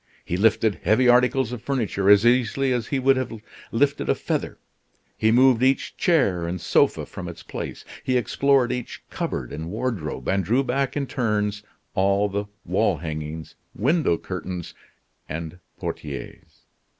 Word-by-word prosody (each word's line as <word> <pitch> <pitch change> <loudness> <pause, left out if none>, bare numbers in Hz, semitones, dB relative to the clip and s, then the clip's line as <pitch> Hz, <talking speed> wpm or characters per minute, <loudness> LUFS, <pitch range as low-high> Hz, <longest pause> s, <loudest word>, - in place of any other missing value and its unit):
He 85 - -2
lifted 110 +1 +2
heavy 110 +7 +3
articles 125 0 +4
of 125 -3 -5
furniture 115 -7 0
as 105 +2 +7
easily 125 +2 +3
as 120 -3 -2
he 140 - -1
would 135 0 +3
have 125 -4 -3 0.3
lifted 140 +4 +1
a - - +4
feather; - - -3 0.6
he 110 - +2
moved 125 0 +5
each 130 +1 +1
chair 100 - +2
and 90 +2 -3
sofa - - +2
from - - -8
its - - -9
place, - - -6 0.2
he 130 -1 +1
explored 130 +2 +2
each 125 -1 -5
cupboard - - -3
and 80 +2 -5
wardrobe, 95 - -3
and 95 0 +1
drew 120 +10 +2
back 135 +2 -1
in 140 - 0
turns 105 -5 -1 0.3
all 100 +1 +2
the 100 +1 -2 0.2
wall 100 -6 +1
hangings, 80 0 -6 0.2
window 135 - +2
curtains, 90 -1 -6 0.6
and 80 +3 -6 0.2
portieres. - - -7
110 Hz, 150 wpm, -24 LUFS, 95-130 Hz, 0.6 s, as